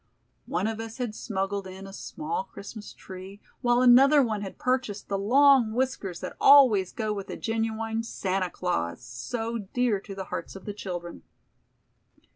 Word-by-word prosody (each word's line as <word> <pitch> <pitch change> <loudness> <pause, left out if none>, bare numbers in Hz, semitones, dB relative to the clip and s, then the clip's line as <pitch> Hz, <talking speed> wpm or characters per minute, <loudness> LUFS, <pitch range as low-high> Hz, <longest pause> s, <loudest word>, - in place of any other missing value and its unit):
One 180 +3 -1
of 220 0 -2
us 225 +1 -6
had 245 -4 -3
smuggled 195 -2 -3
in 190 +1 -9
a 195 - -10
small 420 - -4
Christmas 210 +1 -10
tree, 190 +1 -10 0.2
while 240 0 +3
another 270 +4 +7
one 215 -4 -1
had 195 -2 -7
purchased 250 -5 -1
the 200 - 0
long 260 +1 +5
whiskers 225 -8 -2
that - - -6
always 250 -10 +7
go 215 -2 -2
with 200 -2 -6
a - - -5
genuine 225 0 -2
"Santa 190 -5 -2
Claus", 85 - -2
so 225 - -4
dear 215 +1 0
to 195 0 -9
the 190 -1 -5
hearts 170 - -5
of 195 - -10
the 205 - -4
children. 175 -4 -6
215 Hz, 165 wpm, -27 LUFS, 195-240 Hz, 0.2 s, another